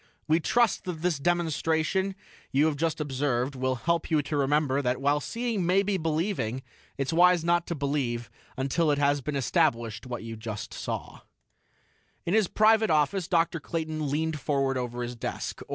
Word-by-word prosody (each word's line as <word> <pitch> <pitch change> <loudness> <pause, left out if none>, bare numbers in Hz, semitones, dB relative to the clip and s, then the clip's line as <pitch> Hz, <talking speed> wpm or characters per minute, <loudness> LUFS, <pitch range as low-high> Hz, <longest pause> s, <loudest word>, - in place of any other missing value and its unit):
"We 160 +1 +4
trust 235 +6 +2
that 170 -3 -5
this 175 -5 +1
demonstration 170 +3 0 0.4
you 140 +3 +3
have 160 -2 +1
just 160 +2 -1
observed 135 -2 -1
will 130 0 -1
help 165 +7 -1
you 155 -3 +2
to 150 - -3
remember 140 0 +2
that 125 -1 0
while 145 +2 +2
seeing 230 - -2
may 185 +3 +3
be 200 0 0
believing, 155 - -1 0.3
it's 135 +3 -1
wise 175 0 +5
not 170 0 +2
to 170 - -2
believe 135 -5 -2 0.3
until 140 +5 +1
it 145 - +2
has 145 0 +2
been 150 +2 -3
established 120 - 0
just - - -10
what 120 -2 -4
you 115 -1 -7 0.3
saw." - - -5 1.1
In 170 - 0
his 215 -3 +4
private 220 +2 +4
office, 160 +4 +2
Dr. 165 -2 +1
Clayton 155 -2 -3
leaned 155 +2 -1
forward 135 -1 0
over 125 -1 -3
his 120 0 -5
desk. 115 - -5
150 Hz, 170 wpm, -27 LUFS, 135-170 Hz, 1.1 s, wise